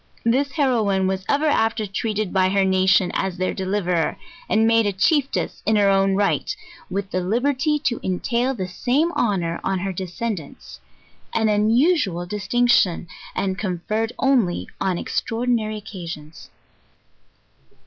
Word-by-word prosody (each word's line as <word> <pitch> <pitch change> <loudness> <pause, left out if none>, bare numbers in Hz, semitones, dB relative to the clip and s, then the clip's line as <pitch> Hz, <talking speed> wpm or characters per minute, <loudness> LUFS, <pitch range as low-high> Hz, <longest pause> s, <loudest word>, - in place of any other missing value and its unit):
This 270 +4 +1
heroine 220 -10 +1
was 190 0 -1
ev 285 +2 +2
er - - +2
after 225 -6 +1
treated 210 0 -2
by 185 -1 +3
her 195 0 +2
nation 190 -1 +3
as 190 -2 -2
their 185 +1 -1
deliverer, 185 -4 -1 0.3
and 220 0 +3
made 225 -1 +4
a - - +1
chieftess 275 - 0
in 220 - +2
her 200 -1 +4
own 195 0 +3
right, 205 - 0 0.3
with 195 +1 -3
the 185 - 0
liberty 265 - +1
to 235 - 0
entail 235 +8 -1
the 190 -5 -3
same 255 - 0
honour 180 - 0
on 195 - 0
her 190 +1 -3
descendants; 185 -2 -6 0.6
an 220 -1 +2
unusual 215 - +2
distinction, 210 -2 +2 0.3
and 190 -1 -1
con 180 -4 -3
ferred 220 +2 0
only 245 -10 +1
on 190 -2 0
extraordinary 225 -1 -1
occasions. 170 -7 -9
205 Hz, 140 wpm, -22 LUFS, 185-235 Hz, 0.6 s, made